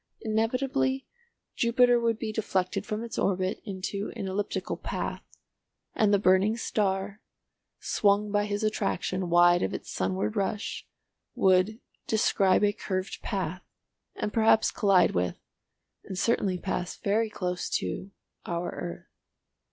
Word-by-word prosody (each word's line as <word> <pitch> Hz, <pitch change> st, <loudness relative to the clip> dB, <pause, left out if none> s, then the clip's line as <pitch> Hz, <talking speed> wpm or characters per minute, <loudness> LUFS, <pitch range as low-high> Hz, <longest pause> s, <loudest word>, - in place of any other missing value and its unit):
Inevitably 255 Hz, +4 st, 0 dB, 0.5 s
Jupiter 245 Hz, +1 st, +4 dB
would 230 Hz, -1 st, +1 dB
be 220 Hz, -1 st, -3 dB
deflected 190 Hz, -4 st, -1 dB
from 215 Hz, +1 st, -3 dB
its 230 Hz, -1 st, -5 dB
orbit 185 Hz, 0 st, 0 dB
into 200 Hz, 0 st, -4 dB
an 195 Hz, -, -4 dB
elliptical 195 Hz, +2 st, -2 dB
path, -, -, -4 dB, 0.7 s
and 215 Hz, -2 st, +3 dB
the 200 Hz, -, +5 dB
burning 195 Hz, +3 st, +3 dB
star, 200 Hz, -2 st, -1 dB, 0.6 s
swung 205 Hz, 0 st, +2 dB
by 205 Hz, 0 st, +2 dB
his 205 Hz, +1 st, -2 dB
attraction 195 Hz, -3 st, -1 dB
wide 175 Hz, 0 st, +5 dB
of 95 Hz, -, -1 dB
its -, -, -7 dB
sunward 95 Hz, +3 st, -1 dB
rush, 200 Hz, +2 st, -2 dB, 0.5 s
would 190 Hz, +4 st, +3 dB, 0.3 s
"describe 200 Hz, -3 st, +3 dB
a 205 Hz, 0 st, +3 dB
curved 190 Hz, -1 st, -4 dB
path" 185 Hz, -2 st, -3 dB, 0.5 s
and 210 Hz, -, -3 dB
perhaps 220 Hz, -1 st, +4 dB
collide 195 Hz, -4 st, +4 dB
with, 90 Hz, 0 st, -1 dB, 0.7 s
and 190 Hz, -, -7 dB
certainly 195 Hz, -3 st, +1 dB
pass 180 Hz, -1 st, -3 dB
very 215 Hz, +2 st, +1 dB
close 180 Hz, -3 st, -3 dB
to, 190 Hz, -, -2 dB, 0.4 s
our 170 Hz, 0 st, -2 dB
earth. 85 Hz, -, -6 dB
200 Hz, 130 wpm, -28 LUFS, 185-220 Hz, 0.7 s, the